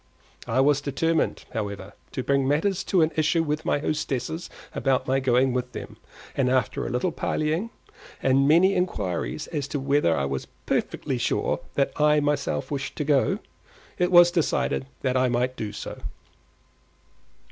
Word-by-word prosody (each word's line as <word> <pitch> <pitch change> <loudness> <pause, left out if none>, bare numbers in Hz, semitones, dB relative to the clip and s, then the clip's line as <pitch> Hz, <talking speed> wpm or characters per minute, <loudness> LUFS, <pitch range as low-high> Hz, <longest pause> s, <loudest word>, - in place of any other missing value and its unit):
I 130 - +2
was 145 0 +3
determined, 160 +4 0
however, 100 -3 -4 0.2
to 130 - -2
bring 140 0 +1
matters 175 +7 +1
to 180 -4 +3
an 160 - +1
issue 160 +1 +2
with 150 0 -2
my - - +2
hostess 150 +2 -3 0.2
about 130 -1 +1
my 135 +1 +2
going 130 0 +2
with 125 0 -3
them, - - -7 0.4
and 130 -2 +2
after 130 -1 0
a - - -3
little 125 +9 0
parleying, 160 +6 -1 0.5
and 135 +1 +3
many 175 +6 +5
inquiries 105 - -2
as 145 -4 -3
to 145 - -3
whether 135 - +2
I 70 - 0
was 70 -1 -3 0.2
perfectly - - -1
sure - - 0 0.2
that 140 - +2
I 150 0 +5
myself 145 -2 -1
wished 140 -1 -3
to - - -2
go, 145 -2 +2 0.6
it 180 0 +2
was 175 -1 +8
decided 165 -5 0 0.2
that 130 -1 +1
I 130 0 +3
might 125 +1 0
do 105 -4 -4
so. 105 - -7
140 Hz, 160 wpm, -25 LUFS, 130-155 Hz, 0.6 s, was